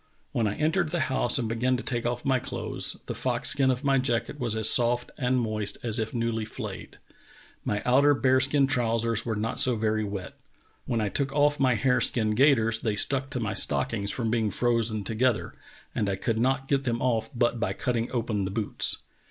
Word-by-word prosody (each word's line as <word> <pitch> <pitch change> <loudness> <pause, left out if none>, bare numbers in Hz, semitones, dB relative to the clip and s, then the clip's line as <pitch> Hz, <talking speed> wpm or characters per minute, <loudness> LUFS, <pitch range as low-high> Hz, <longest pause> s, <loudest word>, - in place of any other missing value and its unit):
When 115 -2 0
I 105 - -2
entered 155 +2 0
the 175 - -2
liouse 130 -2 +1
and 120 -4 -1
began 125 +3 0
to - - -6
take 120 -2 -2
off 120 0 -3
my 135 -1 +2
clothes - - -2
the - - -4
fox - - -1
skin 135 -1 +2
of 130 +2 -1
my 135 -1 +3
jacket 125 +3 -1
was 120 -4 -1
as 110 -1 +5
soft 120 0 +3
and 125 -1 0
moist 110 -3 -2
as 115 -1 0
if 110 -1 -2
newly 115 -2 -2
flayed. 105 - -7 0.7
My 105 0 -2
outer 140 +4 +4
bear 130 +2 +3
skin 140 +1 +2
trousers 115 -3 0
were 110 - -1
not 110 +2 -3
so 125 -2 +5
very 110 0 0
wet. 100 -3 -6 0.5
When 115 -2 0
I 105 - 0
took 135 +5 -1
off 145 0 +2
my 130 -3 +3
hare 125 +2 +1
skin 110 -3 +1
gaiters 115 -2 +3
they 110 -2 -1
stuck 135 +5 +1
to 125 - -4
my 105 -3 -2
stockings 105 -1 0
from 115 -1 -2
being 110 -2 +1
frozen 115 -1 0
together, 115 +2 0 0.4
and 105 - -1
I 100 - 0
could 110 +4 -2
not 135 +2 0
get 140 -1 +1
them 120 -3 -2
off 115 -3 0
but 120 0 +1
by 110 - -1
cutting 120 -1 -2
open 115 -5 -1
the - - -3
boots. 105 +1 -1
120 Hz, 210 wpm, -26 LUFS, 110-130 Hz, 0.7 s, as